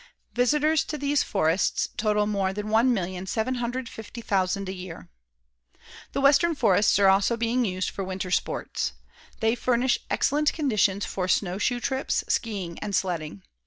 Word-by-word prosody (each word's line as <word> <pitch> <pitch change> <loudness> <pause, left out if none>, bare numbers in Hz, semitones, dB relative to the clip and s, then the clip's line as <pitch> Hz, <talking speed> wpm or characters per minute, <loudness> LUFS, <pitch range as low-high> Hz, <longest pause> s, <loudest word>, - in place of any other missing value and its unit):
Visitors 300 +5 +2
to 300 - -4
these 285 -1 +1
forests 170 -2 +1
total 210 -1 +1
more 200 -2 0
than 210 +1 -4
1,750,000 220 -1 -1
a 190 - -3
year. 180 -2 -9 1.0
The - - -1
western 290 +4 +4
forests 200 -7 +3
are 200 -1 +5
also 195 +4 +3
being 235 +2 +1
used 185 -2 -2
for 195 - -5
winter 185 -1 -4
sports. - - -1 0.5
They 225 0 +3
furnish 245 +1 +1
excellent 295 +2 +1
conditions 210 - +1
for 185 -2 -3
snow 185 0 0
shoe 245 +3 0
trips, 265 +2 -1
skiing 195 -7 -2
and 205 -2 -3
sledding. 155 - -2
210 Hz, 135 wpm, -26 LUFS, 190-245 Hz, 1.0 s, are